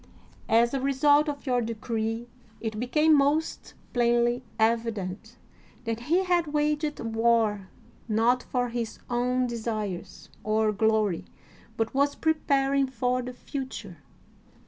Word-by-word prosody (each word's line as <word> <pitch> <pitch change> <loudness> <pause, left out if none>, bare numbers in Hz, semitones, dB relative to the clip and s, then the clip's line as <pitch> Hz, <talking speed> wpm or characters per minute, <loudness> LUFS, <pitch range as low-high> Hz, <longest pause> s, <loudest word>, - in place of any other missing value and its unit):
As 235 +2 +4
a 275 - 0
result 290 +2 +3
of 285 -1 -6
your 250 -2 +1
decree 225 0 -3 0.3
it 220 -2 -4
became 300 +6 +4
most 290 +3 0 0.2
plainly 240 0 +2
evident 220 -1 -1 0.5
that 230 -1 -2
he 360 +3 +4
had 350 -3 +1
waged 300 0 0
war 225 -3 +1 0.4
not 230 +3 +2
for 245 -1 -1
his 235 -1 -4
own 250 +1 +1
desires 215 -6 -4
or 215 0 +2
glory, 215 -3 +1 0.5
but 225 0 -1
was 280 +1 +2
preparing 275 -3 +1
for 250 0 0
the 250 0 -5
future. 245 -8 -6
240 Hz, 120 wpm, -27 LUFS, 220-275 Hz, 0.5 s, As